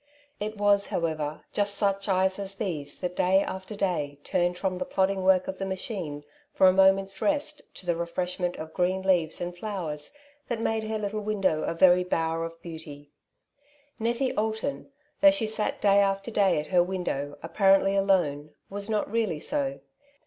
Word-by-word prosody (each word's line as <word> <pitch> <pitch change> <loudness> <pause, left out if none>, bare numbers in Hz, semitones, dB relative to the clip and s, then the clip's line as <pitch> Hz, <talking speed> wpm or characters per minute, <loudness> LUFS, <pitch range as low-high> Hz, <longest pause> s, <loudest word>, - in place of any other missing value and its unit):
It 215 +1 -4
was, 205 -1 +3
however, 155 -3 -2
just 205 0 0
such 200 0 0
eyes 190 0 +2
as 195 0 -5
these 160 -9 -4
that 180 -1 -3
day 190 +2 +3
after 190 +3 -6
day 155 -8 -1
turned 180 -1 0
from 185 -1 -2
the 185 - -2
plodding 190 +1 +1
work 185 -1 +4
of 190 0 -5
the 195 - -2
machine 185 -6 -4 0.3
for 190 - +5
a 185 - +6
moment's 195 +1 +3
rest 300 0 0
to - - -10
the 175 -1 +1
refreshment 175 +1 -2
of 160 0 -8
green 185 +1 0
leaves 175 -4 +2
and 175 0 -4
flowers 175 -7 -5 0.4
that 235 -2 -2
made 225 -1 -1
her 220 0 -2
little 210 0 -3
window 195 -7 0
a - - -2
very 180 +1 +6
bower 165 -2 -1
of 165 0 -9
beauty. 150 -4 -9 0.9
Nettie 240 +3 0
Alton, 220 +6 -2 0.3
though 295 - +9
she 290 -6 +1
sat 215 0 -2
day 200 -1 +4
after 195 +2 +1
day 195 -7 +3
at 150 - -4
her 180 - +6
window 175 -6 -3
apparently 195 +3 +3
alone, 175 -7 +1 0.2
was 200 +1 -3
not 215 -1 0
really 215 -9 0
so. 275 - -2
190 Hz, 175 wpm, -27 LUFS, 175-205 Hz, 0.9 s, though